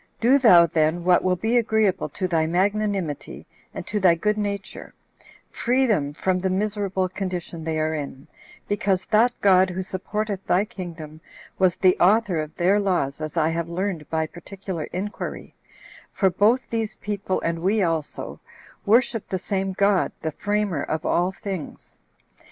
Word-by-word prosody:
Do 255 +5 +4
thou 180 -10 +7
then 160 +1 +1
what 180 0 +4
will 185 0 +2
be 220 +6 +1
agreeable 220 -4 +1
to 185 - -3
thy 160 -3 +1
magnanimity, 195 -3 -1 0.3
and - - -7
to 210 - -2
thy 180 -3 +5
good 210 +5 0
nature: 200 -2 -5 0.6
free 255 +3 +1
them 155 - +1
from 185 +4 0
the 190 +1 -1
miserable 195 -1 -1
condition 180 -3 -5
they 160 0 -2
are 155 0 0
in, 140 -2 -6 0.4
because 195 -2 0
that 230 +3 +5
God, 190 -1 +5
who 185 +1 -3
supporteth 195 +2 -4
thy 190 +4 +3
kingdom, 165 -7 -9 0.4
was 185 -2 +3
the 185 -1 +4
author 195 -2 +3
of 155 0 -8
their 185 +4 +3
laws 175 -8 -1
as 155 +2 -5
I 160 -1 +3
have 165 0 -2
learned 175 -3 -3
by 160 0 0
particular 175 0 -7
inquiry; 200 +3 -6 0.6
for 190 -2 +2
both 225 +7 +2
these 225 -2 -2
people, 200 -2 -3
and 165 0 -1
we 200 +3 +2
also, 165 -3 -3 0.5
worship 230 0 +2
the 190 - -1
same 190 +1 -2
God 200 0 +2
the 160 - -1
framer 205 -3 -1
of 155 +3 -3
all 175 +2 +1
things. 190 -4 -7
185 Hz, 160 wpm, -24 LUFS, 170-205 Hz, 0.6 s, thou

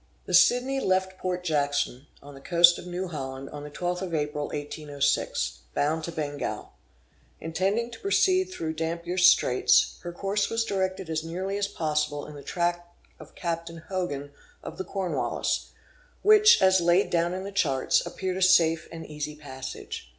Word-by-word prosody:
The 185 - -6
Sidney 250 +9 +4
left 190 -4 0
Port 180 -1 -2
Jackson, 145 -4 -1 0.2
on 145 0 -11
the 135 - -13
coast 170 +4 +5
of 180 - -10
New 180 +1 -3
Holland, 135 -3 -6
on 145 - -7
the 150 - -7
12th 180 +4 -3
of 180 -3 -3
April, 150 -1 -2
1806, 145 - -2 0.2
bound 155 +2 0
to 170 - -5
Bengal. 145 -8 -4 0.7
Intending 195 +8 -1
to 230 - -10
proceed 375 -1 +3
through 165 - -5
Dampier's 170 +3 +1
Straits, 125 -8 +4
her 175 - -6
course 200 +3 -1
was 225 0 0
directed 190 -2 -2
as 160 -1 -2
nearly 185 +4 -4
as 200 0 0
possible 150 -5 -2
in - - -10
the 145 - -10
track 175 +2 -2 0.3
of - - -14
Captain 170 -1 -4
Hogan 145 -7 -3 0.3
of - - -8
the - - -1
Cornwallis, 190 -2 -2 0.5
which, 430 +1 +7
as 190 -1 +5
laid 175 +3 +3
down 170 +1 +1
in 190 - -5
the 200 - -6
charts, 140 -9 +1
appeared 185 +1 -4
a - - -4
safe 170 -3 +4
and 165 0 -8
easy 150 0 -5
passage. 135 - -8
170 Hz, 165 wpm, -27 LUFS, 150-190 Hz, 0.7 s, which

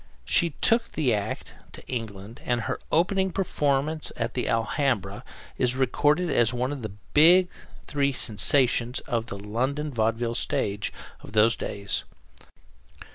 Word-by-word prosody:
She 170 - +3
took 230 0 +2
the 135 -7 +1
act 105 -1 -3 0.2
to - - -11
England 110 -3 -6
and 120 -1 0
her - - -3
opening 190 +3 +2
performance 155 -4 -1
at 115 0 -2
the 125 - -2
Alhambra 115 -4 0 0.4
is 125 0 +2
recorded 145 +6 +2
as 120 -1 +3
one 125 +2 -1
of 145 -3 -5
the 110 - -3
three 100 0 -14 1.0
big 140 -1 +2
sensations 120 +2 +2
of 115 -1 -2
the 100 - -6
London 130 +9 -2
vaudeville 115 +1 0
stage 105 -3 -1 0.3
of 100 - -13
those 110 +1 +4
days. 100 0 -3
120 Hz, 135 wpm, -26 LUFS, 110-145 Hz, 1.0 s, those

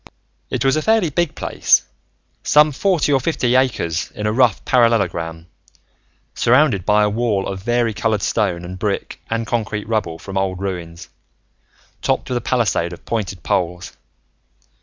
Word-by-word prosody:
It - - -2
was 135 - +3
a 155 - 0
fairly 220 -4 +2
big 170 +1 0
place, - - +2 0.6
some 150 +1 +4
forty 160 -1 +1
or 135 - +4
fifty 125 -4 0
acres 115 -11 0
in 105 - -4
a 105 - +1
rough 125 0 +2
parallelogram, 90 -9 +1 0.9
surrounded 120 - +2
by 105 0 +4
a 105 - +2
wall 110 -3 0
of 95 -1 -5
varicolored 115 -2 0
stone 90 -6 0
and 90 +1 -8
brick 100 0 -3
and 115 0 -1
concrete 110 -3 -2
rubble 110 -7 -1
from 95 +2 -4
old 95 -1 -2
ruins, 90 -3 -5 0.9
topped - - -1
with 125 - +1
a - - -3
palisade 110 -8 0
of - - -13
pointed 100 -7 -3
poles. 90 -1 -2
110 Hz, 150 wpm, -19 LUFS, 95-125 Hz, 0.9 s, some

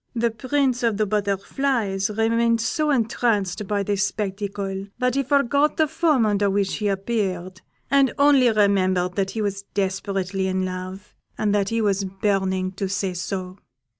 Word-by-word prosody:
The 235 0 +1
Prince 255 +2 0
of 230 -4 +1
the 215 - +2
Butterflies 205 +1 -1
remained 230 +2 +2
so 265 +8 0
entranced 215 -6 0
by 205 0 0
this 200 -1 0
spectacle, 195 -1 -3
that 250 -1 +1
he 275 - +1
forgot 280 +2 +2
the 315 - +3
form 310 -6 +2
under 205 -1 +2
which 195 -1 0
he 210 - -1
appeared, 190 -3 -2 0.3
and 275 -1 +4
only 280 -3 +5
remembered 185 -4 +2
that 195 -1 -1
he 220 +1 -3
was 200 -1 -2
desperately 195 -1 -1
in 185 0 0
love, 185 +2 -7 0.2
and 210 -1 +1
that 200 -1 +1
he 230 0 0
was 200 -2 +1
burning 190 -1 -1
to 195 0 -4
say 195 -1 -1
so. 185 +1 -5
205 Hz, 160 wpm, -23 LUFS, 190-230 Hz, 0.3 s, only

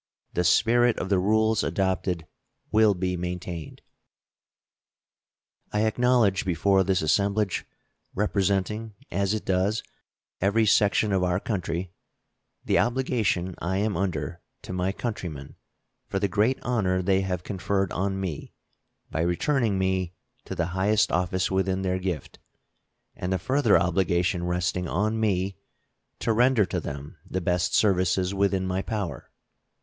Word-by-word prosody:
The 90 - +1
spirit 115 +6 +4
of 95 - -3
the 95 -2 +3
rules 110 +3 +2
adopted 95 -3 -1 0.5
will 110 -2 +5
be 90 0 -1
maintained. 90 -3 -5 1.9
I 105 - +1
acknowledge 110 -3 +3
before 95 +2 +2
this 95 -2 +1
assemblage, 100 +5 +1 0.5
representing, 100 +2 0 0.2
as 100 +3 0
it 110 - -5
does, 95 +3 +1 0.6
every 105 +4 +3
section 105 0 +3
of 95 - +2
our 90 0 +1
country, 90 -4 -3 0.7
the - - +3
obligation 115 -8 0
I 95 +2 -1
am 105 0 0
under 85 -2 -2 0.2
to - - -6
my 90 +1 0
countrymen 90 - -5 0.5
for - - -2
the 100 +1 +1
great 105 +8 +2
honor 95 -7 0
they 95 +1 +2
have 90 -2 -3
conferred 95 0 -1
on 95 +1 -1
me 90 -6 -5 0.6
by 80 - -1
returning 110 - +1
me 95 -1 -1 0.3
to - - -5
the 85 - 0
highest 100 +3 +2
office 90 +2 0
within 95 0 0
their 95 0 0
gift, 90 -6 -4 0.8
and 90 - -4
the 95 - +2
further 130 - +3
obligation 85 0 +1
resting 90 0 -1
on 105 +7 0
me 95 -3 0 0.6
to 115 - 0
render 120 -1 +4
to 90 - -2
them 70 -2 -7
the 95 - -3
best 90 0 0
services 95 -2 +2
within 100 -1 +1
my 95 +1 -1
power. 100 -4 -4
95 Hz, 135 wpm, -26 LUFS, 90-105 Hz, 1.9 s, will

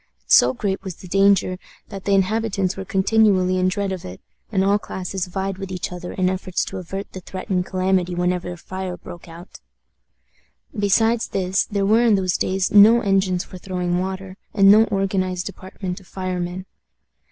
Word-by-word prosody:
So 120 - +6
great 195 - -2
was 190 -3 -6
the 185 - -12
danger, 195 -1 +3 0.3
that 195 -2 -8
the 200 - +3
inhabitants 195 -1 0
were 195 - -5
continually 190 -2 +2
in 185 - +2
dread 200 +1 -1
of 185 -2 -5
it, 90 +1 -9 0.3
and 190 -3 +2
all 200 +1 +3
classes 190 -1 -5
vied 190 +1 -4
with 195 -1 -6
each 180 -1 -4
other 180 0 -7
in 185 -1 0
efforts 185 -1 -1
to - - -6
avert 195 +2 -6
the 185 - -7
threatened 185 0 -3
calamity 185 -1 0
whenever 180 0 -1
a 175 - -7
fire 185 0 -6
broke 175 - -11
out. 170 +3 -12 1.2
Besides 225 +3 +2
this, 190 0 0
there 200 -1 -1
were 220 +4 +4
in 230 -3 +4
those 185 -2 0
days 190 0 0
no 215 +3 +7
engines 195 -3 +1
for 185 - -11
throwing 180 -1 -2
water, 190 0 -5 0.2
and 195 -1 +7
no 215 +2 +7
organized 190 -3 -1
department 185 0 -6
of 190 - -19
firemen. 185 -1 -4
190 Hz, 175 wpm, -21 LUFS, 180-195 Hz, 1.2 s, no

